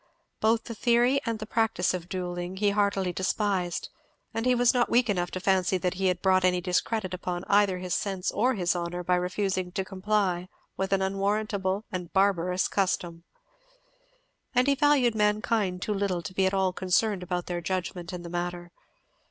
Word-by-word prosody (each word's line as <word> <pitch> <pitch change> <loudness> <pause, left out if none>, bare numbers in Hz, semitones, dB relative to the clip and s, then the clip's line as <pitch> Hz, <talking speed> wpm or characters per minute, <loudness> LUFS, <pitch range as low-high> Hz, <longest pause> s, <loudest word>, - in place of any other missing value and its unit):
Both 225 +1 +2
the 230 - -6
theory 240 +4 +3
and 230 -1 0
the 215 - -6
practice 220 -6 +1
of 175 -1 -5
duelling 180 0 -4
he 205 +1 +2
heartily 200 -3 +1
despised, 190 -1 -1 0.4
and 225 +2 -1
he 250 - +4
was 245 0 +4
not 245 -1 +2
weak 240 -2 +3
enough 175 -3 -1
to 185 - -5
fancy 190 0 +2
that 180 0 -1
he 190 0 0
had 180 -1 -1
brought 185 -1 +4
any 180 -1 +3
discredit 185 +2 -1
upon 180 -1 -4
either 200 -2 +3
his 180 -1 -4
sense 190 +2 -1
or 250 +4 +1
his 180 -3 0
honour 175 0 -3
by 180 - +1
refusing 185 0 -1
to 190 - -2
comply 190 -2 -1 0.3
with 190 0 -2
an 195 -1 +2
unwarrantable 195 0 -1
and 180 -2 -5
barbarous 185 -2 +2
custom. 175 -3 -1 1.3
And 250 +1 +4
he 280 - +4
valued 280 -4 +3
mankind 210 -3 +1
too 210 - -1
little 195 -4 -1
to 160 - -6
be 190 0 +2
at 190 - -1
all 190 -1 +1
concerned 190 +2 +1
about 180 -1 -3
their 175 -1 -3
judgment 180 -1 -3
in 180 -1 -6
the 170 - -7
matter. 175 0 -4
190 Hz, 185 wpm, -27 LUFS, 180-210 Hz, 1.3 s, he